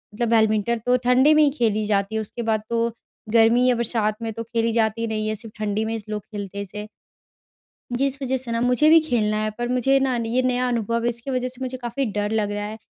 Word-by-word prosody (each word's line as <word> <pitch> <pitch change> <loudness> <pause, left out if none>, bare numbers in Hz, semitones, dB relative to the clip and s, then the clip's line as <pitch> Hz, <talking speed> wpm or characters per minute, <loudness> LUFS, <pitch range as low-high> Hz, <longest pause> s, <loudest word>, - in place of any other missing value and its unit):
मतलब 235 0 -1
बैडमिंटन 220 0 +2
तो 250 0 +4
ठंडी 260 +5 +5
में 305 0 +5
ही 290 - +5
खेली 215 -2 +1
जाती 205 +1 0
है 220 - 0
उसके 220 +3 -7
बाद 215 -1 +1
तो 235 0 +1 0.4
गर्मी 230 +2 +5
या 250 - +3
बरसात 225 -2 -1
में 225 -1 -3
तो 230 +1 -5
खेली 230 0 -1
जाती 230 0 0
नहीं 215 -1 -2
है 215 - -1
सिर्फ़ 220 0 -11
ठंडी 215 +1 -1
में 225 +1 -2
इस 215 -2 -7
लोग 210 -1 -3
खेलते 200 -2 -7
हैं 200 - -2
इसे। 210 +2 -8 1.1
जीस 275 +2 0
वज़ह 265 0 0
से 245 -2 -6
न 230 - 0
मुझे 250 +5 +4
भी 325 0 +8
खेलना 220 -8 0
है 215 - 0
पर 240 0 -2
मुझे 260 +2 +3
न 245 -3 0
ये 240 +3 +1
नया 250 0 +1
अनुभव 230 -1 -1
है 240 - +2
इसकी 235 +3 -5
वज़ह 255 0 -1
से 255 0 -8
मुझे 255 0 -4
काफ़ी 250 +2 -3
डर 205 +1 -2
लग 210 -2 0
रहा 205 0 -3
है। 215 +1 -6
230 Hz, 245 wpm, -23 LUFS, 215-250 Hz, 1.1 s, भी